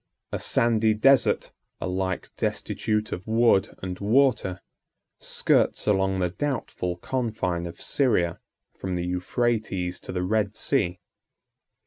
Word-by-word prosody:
83 -, -, +1 dB
A -, -, -2 dB
sandy 110 Hz, -2 st, +2 dB
desert, 135 Hz, +5 st, +3 dB, 0.3 s
alike 95 Hz, 0 st, -2 dB
destitute 105 Hz, 0 st, -1 dB
of 90 Hz, -, -5 dB
wood 115 Hz, -3 st, +3 dB
and 90 Hz, -1 st, -4 dB
water, 105 Hz, -4 st, +2 dB, 0.6 s
skirts -, -, +1 dB
along 95 Hz, -2 st, +2 dB
the 90 Hz, -2 st, 0 dB
doubtful 95 Hz, -9 st, -3 dB
confine 100 Hz, -8 st, -2 dB
of 85 Hz, -, -10 dB
Syria, 90 Hz, -, +1 dB, 0.4 s
from 95 Hz, -1 st, -4 dB
the 90 Hz, 0 st, -2 dB
Euphrates 90 Hz, 0 st, -1 dB
to -, -, -8 dB
the 90 Hz, -1 st, -2 dB
Red 105 Hz, +1 st, 0 dB
Sea. 90 Hz, -10 st, 0 dB
95 Hz, 120 wpm, -26 LUFS, 90-115 Hz, 0.6 s, desert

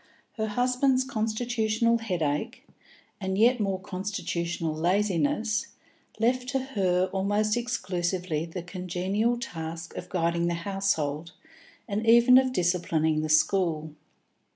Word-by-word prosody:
Her 220 Hz, -1 st, -1 dB
husband's 255 Hz, +4 st, +2 dB
constitutional 230 Hz, -1 st, 0 dB
headache, 165 Hz, -9 st, -2 dB, 0.5 s
and 190 Hz, -1 st, -2 dB
yet 240 Hz, +3 st, +4 dB
more 195 Hz, -3 st, -1 dB
constitutional 180 Hz, -4 st, -3 dB
laziness, 195 Hz, +5 st, 0 dB, 0.5 s
left 250 Hz, +2 st, +1 dB
to 270 Hz, 0 st, 0 dB
her 185 Hz, -2 st, +2 dB
almost 205 Hz, +2 st, +1 dB
exclusively 185 Hz, -8 st, -2 dB
the 170 Hz, +1 st, -6 dB
congenial 185 Hz, +6 st, -1 dB
task 165 Hz, -8 st, -6 dB
of 180 Hz, -, -7 dB
guiding 170 Hz, -1 st, 0 dB
the 170 Hz, -, 0 dB
household, 170 Hz, -4 st, -2 dB, 0.5 s
and 210 Hz, 0 st, -2 dB
even 235 Hz, +2 st, +7 dB
of 260 Hz, -1 st, 0 dB
disciplining 170 Hz, -6 st, +1 dB
the 155 Hz, -, -3 dB
school. 160 Hz, -1 st, +2 dB
190 Hz, 110 wpm, -27 LUFS, 170-225 Hz, 0.5 s, even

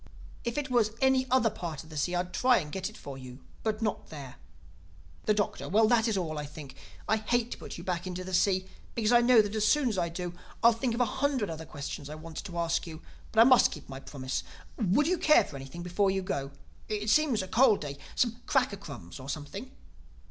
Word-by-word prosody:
If 235 Hz, +1 st, -3 dB
it 290 Hz, -3 st, -2 dB
was 220 Hz, -3 st, +3 dB
any 265 Hz, -1 st, +3 dB
other 250 Hz, -3 st, +3 dB
part 165 Hz, -4 st, -5 dB
of 160 Hz, -, -16 dB
the -, -, -8 dB
sea 175 Hz, +5 st, 0 dB
I'd 180 Hz, +1 st, -2 dB
try 250 Hz, -1 st, +4 dB
and 150 Hz, -4 st, -3 dB
get 190 Hz, +3 st, -3 dB
it 215 Hz, -, -14 dB
for 135 Hz, -2 st, -8 dB
you; 130 Hz, 0 st, -11 dB, 0.2 s
but 220 Hz, 0 st, -1 dB
not 215 Hz, -, -2 dB
there." 140 Hz, -5 st, -9 dB, 0.9 s
The 215 Hz, -, +4 dB
Doctor: 205 Hz, -1 st, -1 dB
"Well, 215 Hz, +3 st, +5 dB
that 235 Hz, -1 st, +4 dB
is 220 Hz, -3 st, +1 dB
all, 155 Hz, -4 st, -2 dB
I 150 Hz, -, -4 dB
think. 150 Hz, -2 st, -10 dB, 0.3 s
I 220 Hz, -, +3 dB
hate 235 Hz, +2 st, 0 dB
to -, -, -6 dB
put -, -, -8 dB
you 170 Hz, -, -8 dB
back 180 Hz, -1 st, -2 dB
into 185 Hz, 0 st, -4 dB
the 185 Hz, 0 st, -7 dB
sea, 185 Hz, 0 st, +3 dB, 0.3 s
because 225 Hz, -1 st, +1 dB
I 240 Hz, 0 st, +7 dB
know 240 Hz, -2 st, +6 dB
that 205 Hz, 0 st, -4 dB
as 215 Hz, -1 st, +2 dB
soon 285 Hz, +1 st, +3 dB
as 205 Hz, -5 st, -1 dB
I 170 Hz, -1 st, 0 dB
do, 175 Hz, +1 st, -5 dB, 0.3 s
I'll 235 Hz, -, +8 dB
think 230 Hz, +1 st, -1 dB
of 245 Hz, -, 0 dB
a -, -, +5 dB
hundred 265 Hz, -5 st, 0 dB
other 160 Hz, 0 st, -7 dB
questions 145 Hz, -1 st, -6 dB
I 155 Hz, -, -6 dB
wanted 160 Hz, +3 st, -8 dB
to 175 Hz, -2 st, -7 dB
ask 170 Hz, 0 st, 0 dB
you. 160 Hz, 0 st, -9 dB, 0.3 s
But 220 Hz, -, +5 dB
I -, -, +11 dB
must 255 Hz, 0 st, +6 dB
keep -, -, -9 dB
my 135 Hz, 0 st, -7 dB
promise. 130 Hz, -, -4 dB, 0.4 s
Would 220 Hz, +7 st, +3 dB
you 355 Hz, +2 st, +1 dB
care 305 Hz, -, +6 dB
for -, -, -10 dB
anything 135 Hz, +5 st, -7 dB
before 195 Hz, +3 st, +1 dB
you 190 Hz, 0 st, 0 dB
go?—it 140 Hz, +8 st, -5 dB
seems 275 Hz, -9 st, +3 dB
a -, -, -7 dB
cold 220 Hz, +1 st, +4 dB
day—some 150 Hz, -, -2 dB
cracker 250 Hz, -7 st, +2 dB
crumbs 120 Hz, -, -9 dB
or 130 Hz, +1 st, -8 dB
something?" 155 Hz, -, -5 dB
195 Hz, 235 wpm, -29 LUFS, 155-235 Hz, 0.9 s, I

